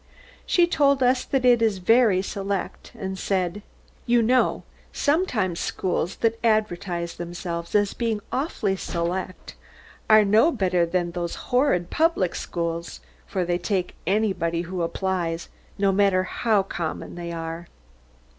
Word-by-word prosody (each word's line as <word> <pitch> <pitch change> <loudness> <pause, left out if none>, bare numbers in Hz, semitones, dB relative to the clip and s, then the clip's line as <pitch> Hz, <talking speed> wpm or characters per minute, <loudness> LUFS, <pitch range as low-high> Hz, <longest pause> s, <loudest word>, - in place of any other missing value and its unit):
She 350 - +4
told 280 -5 +2
us 250 0 +3
that 265 -2 0
it 240 -2 +5
is 220 -3 +2
very 210 -1 +4
select, 195 -1 -4
and 190 -1 -5
said, 185 0 -1 0.5
"You 240 -1 +4
know 250 +3 +2 0.3
sometimes 255 - 0
schools 180 0 -2
that 230 0 +1
advertise 180 -6 0
themselves 170 0 -5
as 205 -1 +3
being 230 -3 -1
awfully 255 - -1
select 185 +2 -4 0.6
are 215 -1 +7
no 220 +11 +4
better 185 - +1
than 175 0 -1
those 170 -1 -3 0.2
horrid 215 -10 +2
public 315 - +2
schools, 170 0 -4 0.3
for 185 -2 -1
they 175 0 0
take 185 -3 -1
anybody 185 -5 0
who 180 +1 -4
applies, 170 -1 -2 0.3
no 200 -1 +3
matter 190 -1 +3
how 210 +2 +1
common 170 -4 -5
they 175 -1 -6
are." 165 +1 -5
190 Hz, 135 wpm, -24 LUFS, 175-225 Hz, 0.6 s, are